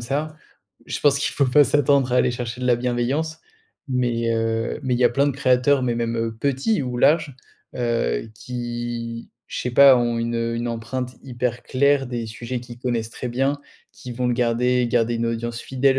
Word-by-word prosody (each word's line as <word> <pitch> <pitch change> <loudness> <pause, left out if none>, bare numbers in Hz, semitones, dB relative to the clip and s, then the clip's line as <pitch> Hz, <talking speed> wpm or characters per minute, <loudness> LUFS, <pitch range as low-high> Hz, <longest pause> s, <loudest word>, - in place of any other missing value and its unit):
ça, 150 +6 -3 0.5
je - - -3
pense 145 -1 +4
qu'il - - 0
faut 140 - +2
pas 140 +4 +6
s'attendre 140 -2 +2
à - - +3
aller 125 - +3
chercher 120 0 -5
de 125 - -2
la 125 - +5
bienveillance. 125 +6 -1 0.5
Mais, 120 -3 0
heu, 115 0 -1
mais 130 -2 0
il - - -1
y - - +4
a - - +7
plein 140 +4 +2
de - - -1
créateurs, 130 0 +2
mais 120 - 0
même 115 -1 -2
petits 140 - +1
ou 125 -1 -4
larges, 150 -3 +3 0.4
heu, 115 - -1
qui, 120 -1 -5 0.2
je - - -5
sais 125 - -2
pas, 135 +1 +8
ont 120 -1 0
une 115 0 -2 0.2
une 120 +1 -2
empreinte 120 +2 -4
hyper 125 -2 -3
claire, 140 +1 +2
des 120 -2 -4
sujets 120 +3 -5
qu'ils 120 -1 -11
connaissent 115 -3 -2
très 125 - -5
bien, 135 +4 0 0.3
qui 125 - -10
vont 125 +1 -2
le 120 - +1
garder 125 +1 +1
garder 120 0 +1
une 115 0 -1
audience 115 0 -3
fidèle, 135 0 +1
125 Hz, 195 wpm, -22 LUFS, 115-135 Hz, 0.5 s, pas